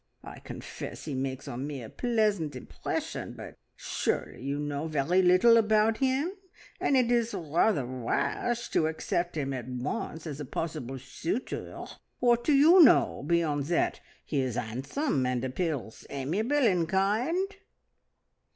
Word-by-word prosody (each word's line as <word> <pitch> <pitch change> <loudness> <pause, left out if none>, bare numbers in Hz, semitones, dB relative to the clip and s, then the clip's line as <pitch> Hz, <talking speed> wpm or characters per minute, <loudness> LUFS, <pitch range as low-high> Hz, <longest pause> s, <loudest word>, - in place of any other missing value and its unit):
I - - -9
confess - - -8
he 150 - -4
makes 130 0 -3
on 130 +4 -4
me 140 -4 -5
a - - -7
pleasant 210 - 0
impression, 125 - -4
but - - -9 0.2
surely - - -2
you 140 +2 -2
know 145 +1 -3
very 155 +4 +2
little 185 +6 +6
about 220 0 +3
him, 270 +5 +1 0.5
and 275 - +2
it 245 -2 +3
is 235 -2 +1
rather 165 - +1
rash 130 - -1
to 155 - +2
accept 165 +1 -2
him 135 -2 -1
at 125 -2 -5
once 130 +5 -4
as 150 -3 -5
a 145 - -4
possible 135 -3 -4
suitor. 165 - -4 0.3
What 240 -1 +3
do 300 - +2
you 320 +7 +7
know 275 - +5
beyond 155 -4 +1
that 170 +3 0 0.3
he 145 -3 0
is 130 -3 -2
handsome, 135 - -1
and 125 0 -1
appears 130 -4 -3
amiable 185 - -1
and 175 -6 +2
kind?" 245 - +1
165 Hz, 145 wpm, -29 LUFS, 135-230 Hz, 0.5 s, you